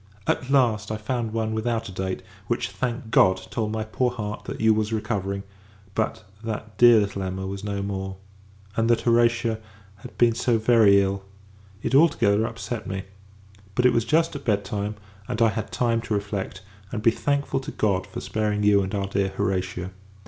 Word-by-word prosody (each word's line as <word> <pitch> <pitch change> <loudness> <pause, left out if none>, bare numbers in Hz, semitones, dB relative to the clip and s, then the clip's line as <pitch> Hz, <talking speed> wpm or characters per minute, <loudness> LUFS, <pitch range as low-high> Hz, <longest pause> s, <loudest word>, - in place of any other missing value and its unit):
At 130 - 0
last, 120 -7 +3
I 110 - -1
found 115 +1 -2
one 110 0 -1
without 115 +1 -1
a - - -7
date: 95 0 -3 0.2
which, 120 - -1
thank 120 -3 -3
God! 95 -2 +5
told 110 -2 -1
my 110 0 -2
poor 125 +3 0
heart, 105 -3 -5
that - - -6
you 110 0 +5
was 110 0 0
recovering; 100 -3 -2 0.5
but, 110 +1 -1 0.2
that 110 -1 -5
dear 120 -2 +8
little 100 -1 -2
Emma 95 0 -3
was 95 +1 -5
no 100 -1 -2
more! 95 -1 -4 0.6
and, 115 +1 +1
that 120 - +3
Horatia 115 -1 +2 0.4
had 120 +5 -12
been 120 -1 +5
so 120 0 +1
very 110 -3 +5
ill 100 0 0 0.6
it - - -2
all 160 +5 +7
together 110 -5 +2
upset 115 0 -5
me. 95 -1 -3 0.7
But, 125 - +2
it 125 - +6
was 115 -1 +2
just 160 +6 +2
at 140 - -6
bed 100 -4 +1
time; 105 +1 -3 0.3
and - - -3
I 115 -1 +5
had 110 0 -4
time 115 -2 +1
to 110 - -2
reflect, 100 -2 -4 0.3
and 110 -3 -4
be 115 - +6
thankful 140 +2 0
to 135 +3 -6
God 100 -4 0
for - - -6
sparing 105 -1 -1
you 100 -1 +5
and 95 +2 -3
our 100 -1 0
dear 100 0 0
Horatia. 90 -1 -2
110 Hz, 190 wpm, -25 LUFS, 100-115 Hz, 0.7 s, dear